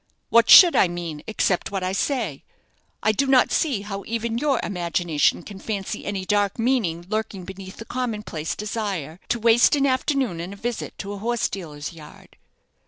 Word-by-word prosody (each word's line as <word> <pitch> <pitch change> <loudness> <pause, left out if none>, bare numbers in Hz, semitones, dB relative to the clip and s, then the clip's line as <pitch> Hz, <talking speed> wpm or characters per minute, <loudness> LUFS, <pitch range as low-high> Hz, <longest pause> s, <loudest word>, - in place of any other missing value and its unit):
"What 235 0 +4
should 355 -3 +10
I - - +5
mean 170 -3 -5
except 200 -4 0
what 195 -2 -3
I 185 - -1
say? 200 - -2 0.6
I 215 - +4
do 275 +6 0
not 265 -2 +4
see 260 -11 0
how 200 -1 -6
even 230 +1 -2
your 280 -2 +1
imagination 175 -4 0
can 200 -2 -10
fancy 200 -2 -4
any 195 -2 -3
dark 205 -1 +1
meaning 225 -9 0
lurking 215 -3 -3
beneath 190 0 -9
the 225 - -8
common 235 -4 -3
place 160 -5 -4
desire 200 -7 -4
to 240 - 0
waste 230 +4 +5
an 280 -1 +2
afternoon 260 - 0
in 180 +3 -6
a - - -9
visit 235 +3 -5
to 200 +1 -6
a 200 - -7
horse 235 +2 0
dealer's 155 -4 -7
yard." 155 -2 -15
205 Hz, 180 wpm, -23 LUFS, 180-235 Hz, 0.6 s, should